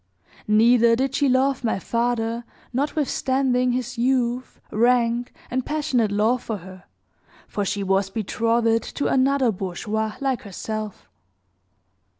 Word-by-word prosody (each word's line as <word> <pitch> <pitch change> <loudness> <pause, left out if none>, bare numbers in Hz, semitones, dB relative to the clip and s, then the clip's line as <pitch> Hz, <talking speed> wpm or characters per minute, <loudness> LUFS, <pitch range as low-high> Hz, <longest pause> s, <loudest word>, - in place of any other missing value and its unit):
Neither 230 +2 +5
did 265 +2 -1
she 280 -1 +2
love 260 0 +2
my 225 - +1
father 235 +2 -1 0.3
notwithstanding 260 -2 +1
his 250 0 -3
youth, 250 0 0
rank, 240 +1 +2 0.2
and 255 +1 0
passionate 255 -8 0
love 220 +4 +2
for 220 -3 -4
her, 185 0 -12 0.6
for 205 - -2
she 200 +1 -2
was 195 0 +1
betrothed 230 +2 +1
to 285 - -1
another 270 -2 +3
bourgeois, 210 +3 -3
like 270 -3 -1
herself. 215 0 -6
235 Hz, 120 wpm, -23 LUFS, 215-255 Hz, 0.6 s, Neither